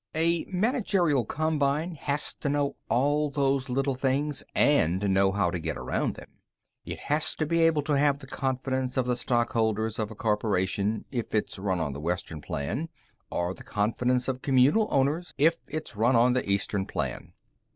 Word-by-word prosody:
A 165 Hz, +1 st, +1 dB
managerial 190 Hz, -, +1 dB
combine 155 Hz, -, 0 dB
has 145 Hz, -1 st, -2 dB
to 145 Hz, -, -3 dB
know 145 Hz, 0 st, 0 dB
all 145 Hz, +4 st, +2 dB
those 135 Hz, -2 st, 0 dB
little 135 Hz, +2 st, 0 dB
things 135 Hz, +2 st, -1 dB
and 100 Hz, -, +3 dB
know 95 Hz, 0 st, +4 dB
how 95 Hz, -3 st, +1 dB
to 90 Hz, -, -3 dB
get 80 Hz, -1 st, -3 dB
around -, -, -2 dB
them. -, -, -14 dB, 0.4 s
It -, -, -7 dB
has 150 Hz, +1 st, +1 dB
to 155 Hz, -, -1 dB
be 165 Hz, +2 st, +1 dB
able 165 Hz, -3 st, +3 dB
to 150 Hz, 0 st, +1 dB
have 140 Hz, 0 st, +3 dB
the 140 Hz, -, -11 dB
confidence 130 Hz, -1 st, -2 dB
of 130 Hz, -, +2 dB
the 125 Hz, 0 st, +1 dB
stock 120 Hz, 0 st, 0 dB
holders 110 Hz, -1 st, 0 dB
of 110 Hz, -1 st, -1 dB
a 110 Hz, -, -9 dB
corporation 105 Hz, -1 st, 0 dB
if 120 Hz, -4 st, -3 dB
it's 105 Hz, -2 st, -1 dB
run 95 Hz, -2 st, -1 dB
on 75 Hz, -4 st, -2 dB
the 70 Hz, -, -7 dB
Western 85 Hz, -2 st, -3 dB
Plan 100 Hz, -, -3 dB, 0.4 s
or 90 Hz, +1 st, -1 dB
the -, -, -12 dB
confidence 125 Hz, +4 st, 0 dB
of 130 Hz, -1 st, -2 dB
communal 140 Hz, -, +4 dB
owners 145 Hz, +6 st, 0 dB
if 165 Hz, +4 st, +3 dB
it's 155 Hz, -6 st, -5 dB
run 115 Hz, +5 st, +3 dB
on 120 Hz, +2 st, +5 dB
the 125 Hz, -5 st, -1 dB
Eastern 100 Hz, 0 st, 0 dB
Plan. -, -, -4 dB
130 Hz, 180 wpm, -27 LUFS, 105-150 Hz, 0.4 s, on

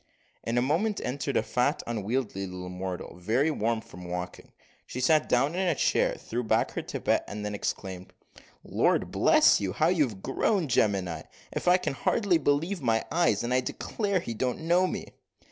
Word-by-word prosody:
In 115 Hz, +1 st, -1 dB
a 120 Hz, -, +3 dB
moment 185 Hz, +10 st, +1 dB
entered 135 Hz, +1 st, -2 dB
a -, -, +2 dB
fat 125 Hz, +5 st, 0 dB
unwieldy 110 Hz, -2 st, -2 dB
little 90 Hz, 0 st, -7 dB
mortal, 90 Hz, -1 st, -5 dB
very 120 Hz, -, +1 dB
warm 115 Hz, -4 st, 0 dB
from 90 Hz, -3 st, -12 dB
walking; 90 Hz, 0 st, -6 dB, 0.4 s
she 125 Hz, -, -6 dB
sat 155 Hz, +4 st, +3 dB
down 135 Hz, +5 st, +2 dB
in 185 Hz, +1 st, 0 dB
a 170 Hz, -, +2 dB
chair, -, -, +2 dB
threw 120 Hz, +2 st, -4 dB
back 110 Hz, 0 st, +1 dB
her -, -, -3 dB
tippet, -, -, 0 dB
and 105 Hz, 0 st, -5 dB
then 105 Hz, -, -3 dB
exclaimed, 95 Hz, -2 st, -4 dB, 0.5 s
"Lord -, -, +1 dB
bless -, -, +5 dB
you, 95 Hz, -2 st, -2 dB
how 160 Hz, +2 st, +2 dB
you 175 Hz, -4 st, +3 dB
have 100 Hz, -5 st, -10 dB
grown! 175 Hz, +5 st, +1 dB
gemini, 95 Hz, -, +1 dB, 0.3 s
if -, -, -4 dB
I 180 Hz, +1 st, +7 dB
can 180 Hz, -6 st, -3 dB
hardly 175 Hz, -, +1 dB
believe 160 Hz, +6 st, 0 dB
my 115 Hz, -3 st, +1 dB
eyes; 160 Hz, -, +2 dB
and 120 Hz, +1 st, -1 dB
I 130 Hz, -, +4 dB
declare 200 Hz, -, -2 dB
he 120 Hz, -9 st, -5 dB
don't 125 Hz, +5 st, -2 dB
know 175 Hz, +3 st, +3 dB
me." -, -, -6 dB
125 Hz, 185 wpm, -28 LUFS, 100-160 Hz, 0.5 s, I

